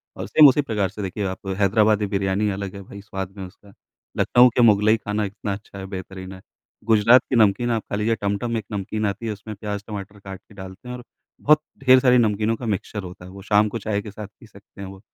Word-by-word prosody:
और - - -6
सेम 155 -2 +7
उसी 140 +2 +4
प्रकार 105 -7 -1
से 105 +3 -8
देखिए 100 +1 -4
आप 95 +1 -6
हैदराबादी 105 +1 +3
बिरयानी 100 +1 0
अलग 100 0 -5
है 100 - -8
भई 100 +1 -11
स्वाद 95 -2 -6
में, 95 - -6
उसका 100 +2 -16 0.4
लखनऊ 125 +1 +5
के 125 - +3
मुग़लई 110 0 +5
खाना 105 0 -3
इतना 100 0 -5
अच्छा 100 0 -10
है 95 - -6
बेहतरीन 95 0 -8
है। 95 - -12 0.4
गुजरात 115 +3 +5
की 130 - 0
नमकीन 110 +2 +3
आप 110 -2 -1
खा - - -2
लीजिए 110 +2 0
टमटम 100 +4 -2
में 115 - 0
एक 105 - -11
नमकीन 105 +2 -3
आती 100 +3 -3
है 110 - -1
उसमें 105 +1 -9
प्याज़ 105 0 -5
टमाटर 105 -1 -8
काट 95 -1 -9
के 105 - -21
डालते 95 +4 -11
हैं 125 - -5
और 125 - -10 0.4
बहुत 150 +1 +4 0.2
ढेर 130 0 +7
सारी 125 -1 +4
नमकीनों 110 0 +1
का 120 - -8
मिक्सचर 105 -1 -3
होता 90 0 -10
है 95 - -11
वो, 100 0 -11
शाम 105 +1 +3
को 115 - -4
चाय 105 0 -2
के 105 -1 -9
साथ 105 0 -8
पी 120 - -15
सकते 100 -1 -16
हैं 95 - -6
वो। 95 0 -11
105 Hz, 245 wpm, -22 LUFS, 95-110 Hz, 0.4 s, सेम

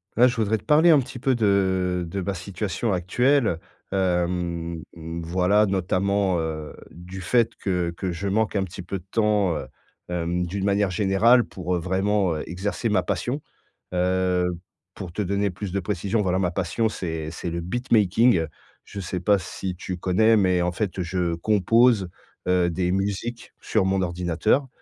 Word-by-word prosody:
Heu, 125 +3 +6
je 125 - -1
voudrais 110 -1 +1
te - - -15
parler 155 +3 +5
un 155 -4 +7
petit 125 0 -6
peu 130 +1 +2
de 95 -4 +1
de 95 +3 -4
ma 100 +2 -2
situation 100 +4 -3
actuelle, 110 - +2 0.3
hem, 90 -3 -1
mmh, 85 0 -6
voilà, 90 +5 +3
notamment, 95 0 +1
heu, 80 -2 -4 0.2
du 90 +3 -9
fait 115 +6 +2
que 90 -3 -1
que 95 +1 -3
je 90 +4 -4
manque 110 +2 0
un 100 - +2
petit 90 0 -7
peu 90 +2 -4
de 90 - -20
temps, 105 -5 +2
heu - - -6 0.4
hem, 90 0 -1
d'une 95 +3 -4
manière 100 0 +2
générale, 105 +6 +4
pour, 90 -3 -3
heu, - - 0
vraiment, 95 +1 +1
heu, 75 - -4
exercer 100 +6 -2
ma 100 -4 +2
passion. 125 +10 -2 0.5
Heu, 90 0 +1 0.5
pour 90 -3 -7
te 105 - -2
donner 100 +1 0
plus 95 +1 -6
de 100 - -1
précisions, 100 +3 -1
voilà 95 -2 +1
ma 90 -3 0
passion, 95 +5 0
c'est 80 -6 -4
c'est 85 +1 -5
le 85 +1 -3
beatmaking, 110 -1 +2 0.4
je 100 - -8
sais 90 -1 -3
pas 100 +3 +3
si 90 0 -5
tu 90 0 -5
connais, 110 +6 +3
mais 90 -3 +3
en 90 - 0
fait, 95 0 -3
heu, - - 0
je 85 -1 -1
compose, 105 +2 +3 0.4
heu, 90 -1 +3
des 90 +1 0
musiques 100 +5 -3
sur - - +1
mon 95 0 +1
ordinateur. 90 - 0
95 Hz, 175 wpm, -24 LUFS, 90-105 Hz, 0.5 s, un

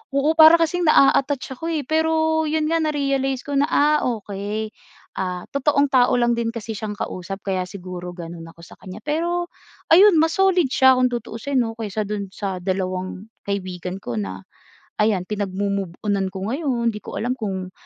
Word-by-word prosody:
oo, 280 +3 +3
para 320 +1 +8
kasing 335 +1 +1
naa-attach 270 -2 +3
ako, 330 - -4
eh. 300 - -1
Pero 320 +1 +1
yun 310 +1 0
nga 330 - +2
na-realize 275 -4 0
ko 290 - -7
na, 290 - +3
ah, 300 -1 +3
okey. 210 -1 -4 0.5
Ah, 180 -1 -4
totoong 280 0 +2
tao 255 -2 +4
lang 240 -1 +2
din 230 -1 -1
kasi 225 -2 -5
siyang 210 0 -4
kausap 195 -1 -6
kaya 185 -2 -2
siguro 180 -2 -8
ganun 170 -1 -8
ako 170 - -17
sa 170 - -14
kanya, 190 +3 -10
pero 345 +5 -1 0.4
ayun 390 +5 +8
mas 325 +2 +1
solid 370 -7 +3
siya 260 0 +5
kung 255 0 +2
tutuusin 240 +3 -4
'no 225 -2 +1
kaysa 215 -2 -4
dun 200 -2 -4
sa 190 -2 -5
dalawang 185 +1 -3 0.2
kaibigan 185 -2 -4
ko 125 -11 -6
na 95 -3 -5 0.5
ayan, 210 -4 +2
pinagmo-move-onan 200 -1 -2
ko 190 +3 -4
ngayon. 255 -5 0
Hindi 210 - -6
ko - - -8
alam 245 +3 -1
kung, 190 -4 -4
225 Hz, 170 wpm, -22 LUFS, 190-290 Hz, 0.5 s, para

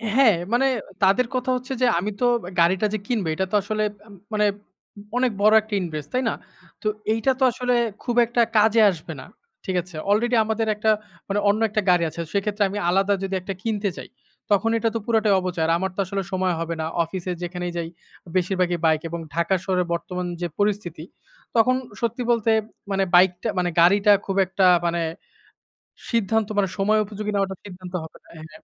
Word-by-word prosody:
হ্যাঁ, 245 -8 +6 0.2
মানে 270 +3 +3 0.4
তাদের 215 +6 +4
কথা 255 0 -1
হচ্ছে 255 +2 -4
যে, - - +5
আমি 205 +4 -2
তো - - +3 0.3
গাড়িটা 185 +5 +3
যে, - - +1
কিনবে 210 -9 -1
এটা 190 - 0
তো - - +1
আসলে, 215 +2 -2 0.2
মা - - -21 0.3
মানে 210 0 +2 0.7
অনেক 250 -2 +2
বড় 215 +1 +5
একটা 215 0 -11
ইনভেস্ট, 155 -4 -5
তাই 255 +1 +1
না? - - -1 0.5
তো 215 - -2 0.3
এইটা 225 +4 +1
তো 265 - +2
আসলে 250 +1 -1 0.3
খুব 240 - -2
একটা 235 +1 +1 0.2
কাজে 220 +1 +5
আসবে 165 -2 -8
না। - - -11 0.4
ঠিক 190 - -2
আছে? 180 -2 -15
আলরেডি 235 +4 +2
আমাদের 220 0 -1
একটা, 215 +1 +2 0.4
মানে 200 +1 0
অন্য 210 +2 +2
একটা 215 +1 0
গাড়ি 175 -1 +4
আছে, 170 - -11
সেক্ষেত্রে 205 +1 0
আমি 200 - -5
আলাদা 195 +2 +2
যদি 195 - -3
একটা 195 +2 -5
কিনতে 210 -3 -1
চাই, - - -9 0.4
তখন 205 +3 +3
এটা 230 0 +1
তো - - +1
পুরাটাই 220 -3 +2
অপচয়। 180 -3 -2
আমার 190 0 -2
তো - - -9
আসলে 195 +1 -3
সময় 185 -1 0
হবে 165 0 -3
না, - - -2 0.2
অফিসে, 180 +2 -5
যেখানেই 175 0 -4
যাই 170 -1 -2 0.5
বেশিরভাগই 180 -1 +1
বাইক 155 -1 +3
এবং 170 - -4 0.2
ঢাকা 170 +3 +1
শহরের 180 -2 0
বর্তমান 180 +1 -4 0.2
যে, 175 - 0
পরিস্থিতি, 200 -6 -1 0.5
তখন 235 +3 +4 0.3
সত্যি 235 +2 -1
বলতে 225 -1 +2 0.4
মানে 195 0 +2
বাইকটা, 180 +3 +4
মানে 180 - +1
গাড়িটা 200 +4 +5
খুব 195 - -2
একটা 190 +1 +1 0.2
মানে 170 0 0 1.1
সিদ্ধান্ত, 225 -2 +1
মানে 200 - +3
সময় 210 +2 +2
উপযোগী 210 +1 -5
নেওয়াটা 195 -1 0
সিদ্ধান্ত 185 -1 -10
হবে 160 - -11
না - - -23
হ্যাঁ, 155 0 -12
200 Hz, 185 wpm, -23 LUFS, 180-220 Hz, 1.1 s, হ্যাঁ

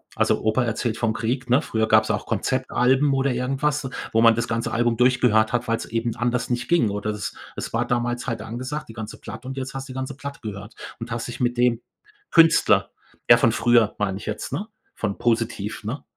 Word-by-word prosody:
also, - - +1
Opa 110 +4 +2
erzählt 115 0 -2
vom 115 -2 0
Krieg, 125 +4 -2
ne? 125 +4 +4
Früher 110 -7 -1
gab's - - +4
auch - - -1
Konzeptalben 130 +2 +1
oder 135 0 +1
irgendwas, 135 +3 -1 0.3
wo 115 - +4
man 115 -1 +7
das 115 0 -1
ganze 115 0 -2
Album 120 0 +1
durchgehört 125 -3 +3
hat, 120 - 0
weil's 115 0 -1
eben 115 0 -2
anders 120 +1 -1
nicht 120 0 -2
ging. 170 -11 +3
Oder 105 +1 -2
es 105 -1 -5 0.2
es - - -5
war 115 +1 +1
damals 120 0 -1
halt 115 -4 -2
angesagt, 125 +7 -5
die - - -9
ganze 110 -1 -7
Platte 110 +3 -9
und 135 +1 -6
jetzt 135 0 -4
hast 135 0 -5
du 130 - -8
die - - -8
ganze 130 +1 -4
Platte 140 0 -7
gehört 105 0 -7 0.3
und 115 +1 -7
hast 115 0 -3
dich 120 - -7
mit 120 -1 +1
dem 120 -1 +2 0.5
Künstler 165 -1 +5 0.4
ja - - +9
von - - +3
früher, 120 -3 +3
meine 95 -2 -1
ich - - -9
jetzt, 105 - -4
ne? 210 - -3 0.3
Von 105 -3 -3
positiv, 115 -3 -1
ne? 115 +8 -5
120 Hz, 215 wpm, -23 LUFS, 110-130 Hz, 0.5 s, ja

